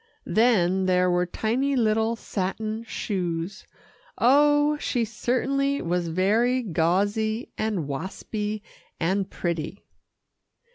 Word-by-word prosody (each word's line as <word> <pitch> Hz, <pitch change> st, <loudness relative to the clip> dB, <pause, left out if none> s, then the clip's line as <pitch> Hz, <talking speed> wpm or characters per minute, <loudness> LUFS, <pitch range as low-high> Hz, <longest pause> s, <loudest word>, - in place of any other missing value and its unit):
Then 190 Hz, -5 st, +3 dB
there 180 Hz, 0 st, +3 dB
were 180 Hz, 0 st, +1 dB
tiny 250 Hz, +9 st, 0 dB
little 225 Hz, -1 st, +2 dB
satin 215 Hz, +2 st, -3 dB
shoes 180 Hz, -4 st, -3 dB, 0.5 s
oh! 290 Hz, +4 st, +4 dB
she 240 Hz, -5 st, 0 dB
certainly 270 Hz, +5 st, 0 dB
was 175 Hz, 0 st, -1 dB
very 220 Hz, +9 st, +2 dB
gauzy, 205 Hz, +5 st, 0 dB
and 210 Hz, -9 st, -2 dB
waspy 210 Hz, +8 st, -4 dB, 0.4 s
and 190 Hz, +3 st, 0 dB
pretty. 170 Hz, +2 st, -4 dB
215 Hz, 95 wpm, -25 LUFS, 180-235 Hz, 0.5 s, oh